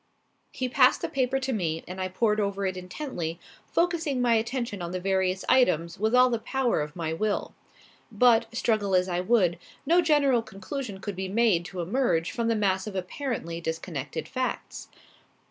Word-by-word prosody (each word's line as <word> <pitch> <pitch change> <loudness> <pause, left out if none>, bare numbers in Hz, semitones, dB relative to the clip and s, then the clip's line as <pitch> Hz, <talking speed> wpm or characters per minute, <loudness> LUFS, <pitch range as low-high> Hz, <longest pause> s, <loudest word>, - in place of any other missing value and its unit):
He 255 - -2
passed 255 +3 +4
the - - +1
paper 270 -2 0
to 265 0 -2
me 165 -6 -2
and 185 +1 -6
I 185 - 0
pored 210 +3 +1
over 200 -1 -1
it 185 -1 -1
intently, 180 - -5 0.3
focusing 335 -6 +1
my 245 -1 +3
attention 225 -2 -1
on 170 - -4
the 185 - -2
various 190 0 0
items 170 -11 +3
with 220 +3 +2
all 250 0 +6
the 235 - 0
power 255 - 0
of 150 +1 -5
my 165 -2 -2
will. 210 +5 -1 0.6
But, 230 +1 +4
struggle 215 -4 +1
as 180 0 +3
I 175 -1 -1
would, 180 -4 +2 0.3
no 340 +5 +5
general 285 -7 +3
conclusion 205 0 -6
could 205 -2 -4
be 190 +1 -3
made 205 -5 +2
to 180 -1 -5
emerge 175 -3 0
from 235 -1 -2
the 230 - +2
mass 190 -2 0
of 205 - -6
apparently 185 - -4
disconnected 160 -3 -4
facts. 255 -1 -4
210 Hz, 180 wpm, -27 LUFS, 180-250 Hz, 0.6 s, all